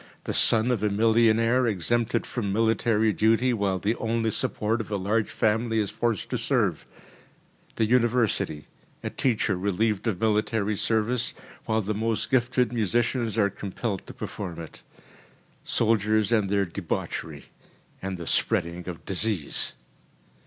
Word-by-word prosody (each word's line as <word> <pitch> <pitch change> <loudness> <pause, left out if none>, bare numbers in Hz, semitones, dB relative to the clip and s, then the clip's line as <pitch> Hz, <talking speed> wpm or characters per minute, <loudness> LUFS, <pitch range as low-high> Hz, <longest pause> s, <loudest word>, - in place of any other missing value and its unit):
The - - -3
son 115 +2 +4
of 115 -5 0
a 105 - +2
millionaire 115 +3 +3
exempted 115 +3 0
from 105 -6 -3
military 110 0 +2
duty, 115 +4 +3
while 100 -4 0
the 100 +4 0
only 115 0 0
support 110 +2 -1
of - - -9
a 105 - -1
large 105 +3 0
family 115 +1 0
is 105 -3 0
forced 115 -4 -2
to - - -1
serve. - - 0 0.9
The 110 - +2
university: 115 -9 +1 0.4
a - - -3
teacher 115 -5 +1
relieved 100 +3 0
of 105 -5 -1
military 110 -1 +1
service, 115 +4 0 0.3
while 110 0 +1
the 105 +1 -2
most 110 +1 -1
gifted 125 -1 +2
musicians 115 +1 0
are 100 -2 +3
compelled 100 0 -4
to - - -8
perform 90 -5 -6
it. 80 - -10 0.8
Soldiers 110 -1 +1
and 105 -4 +2
their 100 0 +2
debauchery 85 0 -5 0.5
and 95 -1 -4
the 85 - -7
spreading 85 +2 0
of 85 - -8
disease. 95 -4 0
110 Hz, 140 wpm, -26 LUFS, 100-115 Hz, 0.9 s, son